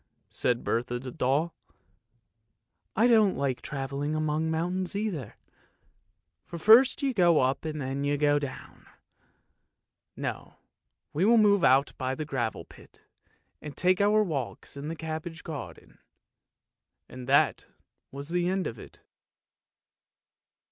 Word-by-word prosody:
" - - -47
said 120 -1 +1
Bertha 120 +1 -1
the 130 +1 -7
doll. 140 +8 0 0.7
" 110 0 -52
I 220 - +4
don't 220 -5 +4
like 135 -3 -1
travelling 140 +2 -3
among 155 +1 0
mountains 180 +4 -2
either, 190 - -3 1.1
for 170 - -8
first 240 - +6
you 270 -2 +1
go 175 -6 +4
up 130 +4 0
and 155 -1 -4
then 135 +1 -3
you 145 0 0
go 145 0 +3
down! 140 -2 -8 1.3
No, - - -5 0.6
we 155 - 0
will 230 +3 +5
move 205 -3 +4
out 135 +2 +4
by 130 0 -1
the 155 - -4
gravel 125 -6 -3
pit - - -18 0.6
and 150 -2 -9
take 185 +1 +2
our 210 +1 +4
walks 140 - -4
in 140 +1 -6
the 165 - -4
cabbage 160 +1 -6
garden." 130 - -9 1.1
And 125 -1 -10
that 140 - +3 0.4
was 140 +3 -7
the 175 +1 0
end 190 0 -1
of 115 - -5
it. - - -14
150 Hz, 135 wpm, -28 LUFS, 135-180 Hz, 1.3 s, first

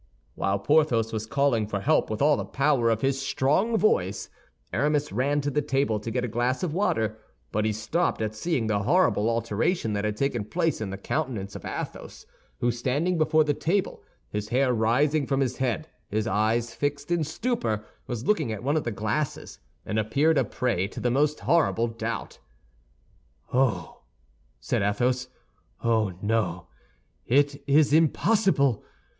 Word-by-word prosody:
While 95 0 0
Porthos 120 -2 +2
was 110 0 -3
calling 140 -5 +1
for 105 -1 -2
help 155 +8 +2
with 110 +5 -1
all 150 0 +5
the - - -3
power 135 -4 +1
of 110 -1 0
his 135 0 0
strong 155 - +1
voice, 100 - +1 0.4
Aramis 150 +6 +1
ran 145 +3 +1
to 145 +1 -2
the 150 - +1
table 135 -6 0
to 105 - -5
get 125 +2 -1
a - - -2
glass 120 - -1
of 165 -4 -1
water; 110 - 0 0.3
but 105 0 0
he 110 - +2
stopped 110 +12 -1
at 110 -1 -2
seeing 130 +1 -1
the 105 -2 +1
horrible 115 - +2
alteration 115 - 0
that 100 0 -1
had 105 -1 -2
taken 130 -4 0
place 165 - -1
in 105 - -3
the 95 - -5
countenance 110 -4 -3
of - - -8
Athos, - - -6 0.4
who, 120 - +2
standing 145 +9 0
before 155 0 +4
the 150 -1 +1
table, 185 +7 -1 0.3
his 105 0 -3
hair 130 +1 +2
rising 135 +6 +2
from 135 -1 +1
his 130 -2 0
head, 130 +4 -1 0.2
his 110 +1 -1
eyes 110 +2 0
fixed 145 +2 -3
in 170 -2 +2
stupor, 150 - -2 0.2
was 120 -2 -4
looking 160 - +1
at 110 -1 -5
one 140 +4 +1
of 155 - 0
the - - 0
glasses, 110 +8 -3 0.3
and 110 - -1
appeared 140 +8 +2
a - - +3
prey 105 -7 -1
to - - -8
the 120 - 0
most 150 +4 +1
horrible 160 -8 +2
doubt. 115 0 -5 1.1
"Oh!" 125 -10 0 0.6
said - - -1
Athos, 125 +6 0 0.6
"oh, 110 -4 +2
no, 100 -5 0 0.6
it 140 +2 +2
is 145 +1 +4
impossible! 160 - +3
125 Hz, 170 wpm, -26 LUFS, 110-150 Hz, 1.1 s, all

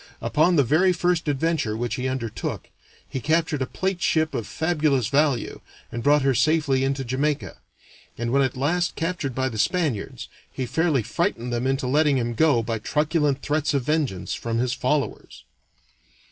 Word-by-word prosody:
Upon 170 +4 +2
the 145 - +5
very 160 +9 +3
first 175 -1 0
adventure 145 -6 0
which 120 +1 -2
he 130 +1 -2
undertook 125 -4 -4 0.4
he 130 - -4
captured 155 0 0
a 130 - 0
plate 190 -2 -2
ship 160 -2 +1
of 110 - -3
fabulous 150 -7 0
value, 140 -3 +1 0.3
and 120 - -4
brought 145 +2 +4
her 135 -1 +3
safely 140 0 +2
into 135 0 -1
Jamaica; 140 +4 -1 0.6
and 120 +1 -2
when 140 - +4
at 130 -2 0
last 165 +6 0
captured 165 -6 -3
by 130 0 0
the 110 -4 -5
Spaniards, 150 - -1 0.2
he 130 - -3
fairly 145 -1 +1
frightened 120 +2 -2
them 120 +2 -1
into 135 0 0
letting 145 +2 +3
him 120 -1 -1
go 130 -2 +3
by 115 0 -2
truculent 150 -1 0
threats 150 0 0
of 135 - +1
vengeance 145 - -1
from 115 -1 -3
his 125 +1 0
followers. 140 +2 -2
140 Hz, 170 wpm, -24 LUFS, 125-155 Hz, 0.6 s, the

